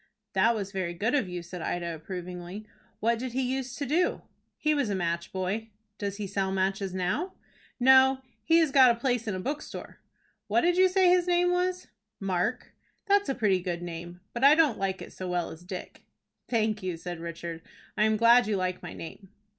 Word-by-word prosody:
"That 225 +4 +4
was 200 -2 -4
very 185 -3 -3
good 215 +7 0
of 265 -10 +1
you," 175 -1 -5
said 175 0 -8
Ida, 170 0 -2
approvingly. 180 +4 -7 0.4
"What 230 +1 +2
did 255 -1 -4
he 260 +1 0
use 265 -1 -4
to 285 - -3
do?" 330 +7 +1 0.3
"He 305 -1 +2
was 285 -7 0
a 200 - 0
match 170 -1 -2
boy." 195 +4 -3 0.3
"Does 200 -1 -3
he 210 - -3
sell 195 0 -1
matches 195 0 0
now?" 190 - -1 0.5
"No; 265 +1 +6 0.2
he 330 - +4
has 320 -4 +3
got 260 -2 +7
a 235 - +3
place 245 -2 0
in 205 - -1
a - - -3
bookstore." 285 +9 -6 0.5
"What 350 - +3
did 350 0 +3
you 370 +1 +5
say 370 0 +4
his 360 0 +4
name 355 0 +3
was?" 365 0 0 0.3
"Mark." 195 +5 -2 0.3
"That's 405 -3 +3
a 270 - 0
pretty 195 -5 +2
good 175 -1 -3
name, 175 +1 -7
but 235 - -3
I 285 +2 +8
don't 310 -8 +3
like 190 -1 -2
it - - -12
so 185 - -6
well 175 -1 -1
as 160 +2 -11
Dick." 180 0 -8 0.5
"Thank 220 -2 +1
you," 180 -3 -3
said 175 0 -6
Richard. 170 0 -6 0.3
"I 215 - +3
am 220 0 +2
glad 235 +1 +6
you 215 - +1
like 185 -1 -2
my 175 - -7
name." 185 +4 -9
210 Hz, 205 wpm, -28 LUFS, 180-265 Hz, 0.5 s, I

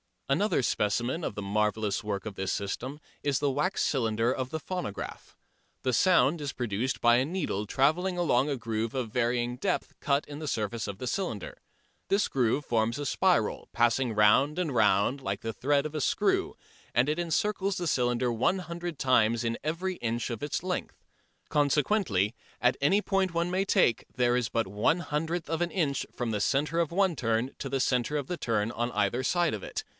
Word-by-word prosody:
Another 140 +1 +2
specimen 120 +9 0
of - - -4
the 105 - -4
marvellous 105 +1 0
work 100 -2 -3
of 105 -3 -6
this 95 0 -2
system 130 +9 -4 0.2
is 140 -2 +1
the 145 -1 +1
wax 150 +8 0
cylinder 115 -3 +1
of 130 -1 -2
the 160 +2 -4
phonograph. 180 - -6 0.5
The 130 - +1
sound 170 +2 +4
is 145 -3 -4
produced 120 +2 -2
by 120 0 +6
a 130 - +2
needle 150 - -2
trailing 170 - +1
along 145 -5 +2
a 140 - 0
groove 115 0 -3
of 125 -4 -2
varying 120 0 0
depth 185 +7 -1
cut 140 0 +1
in 145 0 -7
the 155 - -5
surface 110 -2 -2
of 100 -2 -5
the - - -4
cylinder. 125 - -3 0.5
This 200 +2 +2
groove 130 +2 +1
forms 115 0 +1
a 145 - -4
spiral, - - +1
passing 120 0 +2
round 105 +9 +4
and 170 -6 -1
round 105 +4 +3
like 100 -4 -3
the 115 - -3
thread 140 +5 +1
of 155 - -4
a 155 - -2
screw, - - +1 0.4
and 120 +5 +3
it 155 +3 0
encircles 195 +3 0
the 180 - -3
cylinder 125 -4 +1
one 125 +11 +1
hundred 175 -2 -5
times 115 -3 +3
in 115 0 -1
every 180 +4 -1
inch 120 -4 -2
of 115 -3 -5
its 145 +3 -2
length. 180 -1 -4 0.5
Consequently, 145 - +2 0.3
at 125 +1 +3
any 170 +9 +3
point 195 -3 0
one 170 +1 0
may 190 +2 +1
take, 120 - +2
there 120 0 +3
is 125 -3 0
but 115 +1 0
one 100 +2 -11
one 150 +11 +3
hundredth 160 +2 -2
of 165 +1 -1
an 175 - 0
inch 150 -8 0
from 120 -2 -3
the 105 - -1
centre 150 +8 +1
of 170 -2 +1
one 185 -3 +2
turn 115 +2 0
to - - -4
the 135 0 -1
centre 125 +3 +1
of 145 -3 -2
the 180 - -3
turn 115 -4 0
on 120 +1 -2
either 125 +2 +1
side 175 +2 +2
of 105 - -4
it. - - -5
130 Hz, 200 wpm, -29 LUFS, 115-160 Hz, 0.5 s, by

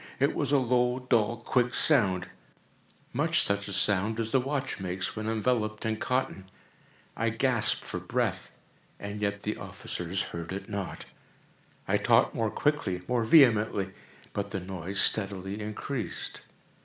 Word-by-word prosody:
It 140 +2 +2
was 145 -1 -1
a 145 - +5
low, 125 -1 +2
dull, 115 -1 +2
quick 125 +1 0
sound—much 95 - 0
such 100 0 0
a - - -5
sound 105 +3 +3
as 115 -1 -1
a 135 - +5
watch 135 -1 -3
makes 95 0 -3
when 110 0 -3
enveloped 110 -1 -1
in 110 -1 0
cotton. 120 -7 -2 0.7
I 115 +1 0
gasped 115 0 +2
for - - -4
breath—and 100 +1 -5
yet 100 -1 -2
the 105 - -2
officers 90 +2 -4
heard 85 0 -5
it 95 - -6
not. 100 -3 -5 0.8
I - - +3
talked - - +3
more 110 -1 0
quickly—more 120 -5 -1
vehemently; 110 - +4 0.4
but 100 0 -3
the 100 - -3
noise 95 +1 -4
steadily 100 -1 +1
increased. 110 +4 -4
110 Hz, 135 wpm, -28 LUFS, 100-125 Hz, 0.8 s, a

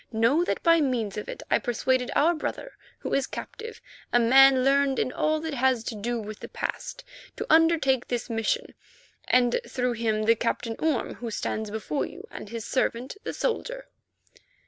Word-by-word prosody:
Know 235 +9 +3
that - - -2
by 335 -1 +5
means 235 -8 -1
of 210 - -5
it - - -7
I - - +4
persuaded 250 +1 0
our 330 +4 +4
brother 425 +9 -5 0.2
who - - -5
is 275 -1 +1
captive, 450 +1 -8 0.3
a - - +4
man 260 +2 +6
learned 275 0 +3
in 255 - 0
all 310 +3 +1
that 320 -1 -4
has 260 -3 +2
to 230 - -4
do 235 +3 -2
with 215 -1 -7
the - - -8
past, - - -5 0.3
to - - -4
undertake 315 -6 +4
this 245 -1 -2
mission, 225 -2 -1 0.5
and 245 -1 +3
through 250 -1 0
him 220 -2 0
the 225 +1 +5
Captain 230 0 -2
Orme 315 -5 0
who 235 - -6
stands 220 0 -3
before 220 +7 -2
you, 380 +6 -11
and - - -8
his 230 -1 -5
servant, 255 -1 -1
the - - -4
soldier." - - -3
255 Hz, 180 wpm, -26 LUFS, 230-305 Hz, 0.5 s, man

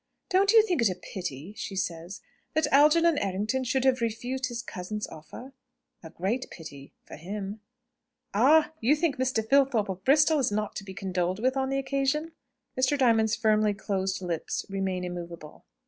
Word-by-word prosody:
"Don't 390 +1 +4
you 450 -1 +7
think 355 - 0
it 230 - +4
a 185 - -3
pity," 175 -2 -7
she 195 - -6
says, 175 +2 -4 0.3
"that 315 - +3
Algernon 305 +2 +5
Errington 205 +7 -1
should 260 +1 0
have 260 -2 +3
refused 245 +3 -2
his 240 -1 -5
cousin's 210 +2 -5
offer?" 240 - -11 0.5
"A 160 - -10
great 205 +11 -2
pity 140 -4 -11
for - - -10
him." 200 +5 -6 0.7
"Ah! 295 +10 +5
you 255 +7 +3
think 310 -2 0
Mr. 255 -4 0
Filthorpe 265 -6 +3
of 190 0 -5
Bristol 300 +4 +4
is 255 - +1
not 210 0 -2
to - - -5
be 190 -1 -9
condoled 185 -2 -1
with 255 +3 +1
on 265 -1 0
the 270 - 0
occasion?" 275 +4 -1 0.4
Mr. 260 +3 +2
Diamond's 225 -4 +3
firmly 215 -1 +2
closed 190 -1 -2
lips 170 -3 -3
remain 190 -2 -2
immovable. 170 -3 -8
220 Hz, 170 wpm, -27 LUFS, 190-270 Hz, 0.7 s, you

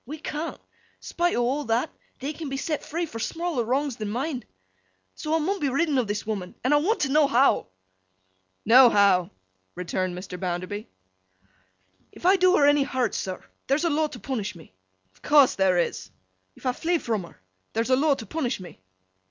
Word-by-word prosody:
We 300 +6 -7
can't. 310 +1 -5 0.4
Spite 350 +1 -1
o' 240 - +1
all 275 +5 -1
that, 230 +6 0 0.3
they 280 +4 -4
can 310 -1 -6
be 270 - -3
set 300 +2 -2
free 340 +3 -3
for 230 -8 -8
smaller 330 +1 -2
wrongs 265 +2 -1
than 215 -2 -4
mine. 255 +3 -3 0.7
So, 310 +1 -2
I - - +4
mun 380 +6 -1
be 285 - 0
ridden 280 +1 +1
o' - - +2
this 205 0 -3
woman, 195 -4 -4
and 260 +4 +2
I - - +6
want 385 +10 +1
t' 275 - +1
know 295 +1 +4
how?' 270 - +3 1.0
'No 245 +3 +8
how,' 195 -5 +4 0.5
returned 180 0 -3
Mr. 180 -1 -7
Bounderby. 185 +3 -4 1.2
'If - - -12
I 375 +2 +6
do 370 -1 +4
her 285 - +5
any 290 0 +5
hurt, 260 -2 -1
sir, 185 -1 -4 0.2
there's 290 +5 +1
a 335 - +2
law 310 +1 +1
to 280 -5 -10
punish 225 -8 -4
me?' 160 - -15 0.4
'Of - - -28
course 290 -3 +5
there 190 -2 +2
is.' 95 - -1 0.5
'If - - -17
I 255 - +3
flee 340 +7 0
from 225 -9 -2
her, - - -17 0.3
there's 230 +3 -1
a - - +6
law 285 +2 +3
to 225 - -8
punish 255 0 -2
me? 180 - -11
265 Hz, 195 wpm, -25 LUFS, 210-305 Hz, 1.2 s, No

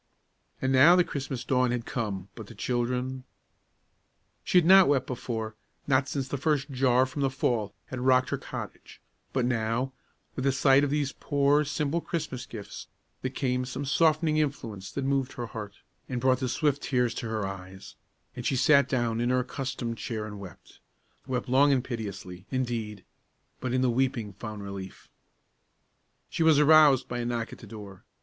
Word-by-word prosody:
And 130 0 0
now 145 +7 +8
the 180 - +5
Christmas 135 -5 -4
dawn 125 -1 +2
had 120 -1 -2
come; 100 -5 -4
but 110 -3 -10
the - - -12
children 125 +1 -2 1.2
She - - +2
had 175 - +5
not 190 +1 +8
wept 140 -2 +2
before, 115 -3 -4 0.3
not 130 -1 +2
since 135 -2 -2
the 140 0 -4
first 145 -1 0
jar 130 -1 +3
from 130 +2 -5
the 135 - +2
fall 120 -6 -1
had 130 - -6
rocked 130 0 +3
her - - 0
cottage; - - -8 0.3
but 130 -2 0
now, 120 +2 -1 0.4
with 130 - -3
the 135 - +3
sight 135 +1 +4
of 145 - +1
these 145 -1 0
poor, 145 +1 +2
simple 150 +3 -1
Christmas 155 -8 -4
gifts, 105 -3 -8 0.3
there 130 - -2
came 125 -1 -1
some 130 +3 -5
softening 155 +2 +2
influence 115 -10 -3
that 140 - -3
moved 135 -1 0
her 120 - -5
heart, 105 -3 -7 0.3
and 125 -2 -2
brought 130 +1 +2
the 130 -2 -1
swift 145 +1 0
tears 125 -3 +1
to 120 - -5
her 110 -2 -2
eyes, 95 -1 -8 0.4
and 120 - -6
she 135 - 0
sat 140 +1 +4
down 120 -3 0
in 120 - +1
her 125 0 +2
accustomed 125 -3 -4
chair 110 -1 -4
and 105 -1 -8
wept 95 -4 -12 0.5
wept 125 -1 -2
long 135 +3 +4
and 130 -3 +2
piteously, 100 -6 -6
indeed, 115 -6 -3 0.5
but 130 - -3
in 130 +1 +1
the 130 -1 +3
weeping 120 -4 -1
found 105 +1 -7
relief. 100 -1 -8 1.2
She - - -4
was 160 -2 +5
aroused 150 -3 +6
by 120 - -4
a 120 - -2
knock 120 -1 -3
at - - -11
the - - -12
door. 100 -4 -10
130 Hz, 180 wpm, -28 LUFS, 115-140 Hz, 1.2 s, now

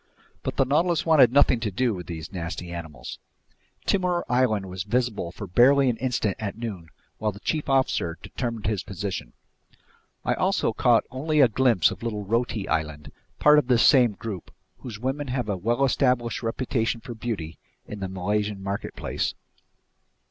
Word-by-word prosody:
But - - -3
the 135 - +3
Nautilus 165 +5 +1
wanted 150 -8 +6
nothing 135 -3 +4
to 115 -2 -1
do 120 +4 0
with 90 -3 -7
these 80 -1 -6
nasty 85 0 -5
animals. 80 -6 -7 0.7
Timor 180 -3 +1
Island 125 -5 +2
was 90 0 -5
visible 105 -3 -1
for 100 - -7
barely 130 +7 +5
an 115 - -6
instant 115 -6 -1
at 105 -1 -4
noon 105 -8 -6 0.3
while 105 -1 0
the 100 - -12
chief 150 +4 -2
officer 130 -11 +1
determined 115 -4 -4
his 105 -2 0
position. 100 +1 -5 0.9
I - - +2
also - - +1
caught - - +4
only 150 +4 0
a 135 - +8
glimpse 115 -6 +3
of - - -8
little 110 -3 -3
Roti 115 -1 -1
Island, 75 -1 -2 0.3
part 150 0 +6
of 140 - -2
this 125 -3 +4
same 125 -6 +6
group, 100 -3 -7 0.3
whose 115 -5 -7
women 135 +4 -2
have 125 -3 -2
a 100 - 0
well 120 +8 +1
established 125 -3 +1
reputation 115 0 -1
for 120 +1 -8
beauty 105 -8 -5 0.3
in 105 - -8
the 95 -1 -4
Malaysian 100 +2 -2
marketplace. 100 +1 -3
115 Hz, 165 wpm, -25 LUFS, 95-130 Hz, 0.9 s, a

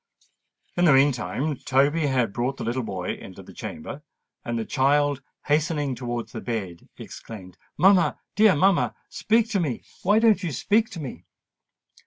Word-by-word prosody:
In 175 - +3
the 155 - +6
meantime 135 +2 +1
Toby 145 +5 +2
had 125 -6 0
brought 125 +3 -2
the - - -5
little 120 +3 -1
boy 95 -6 -4
into - - -11
the - - -14
chamber; - - -7 0.4
and 120 0 -3
the 115 - -3
child, 145 +2 +2 0.2
hastening 150 -2 0
towards 120 -1 -5
the - - -6
bed, 100 -8 -5
exclaimed, 95 -5 -10 0.2
"Mamma—dear 195 +1 +3
mamma—speak 200 +6 +1
to 200 - +1
me—why 175 - -1
don't 220 -3 +4
you 175 -4 -3
speak 215 - +1
to 185 -6 -8
me?" 125 - -8
145 Hz, 145 wpm, -24 LUFS, 120-175 Hz, 0.4 s, the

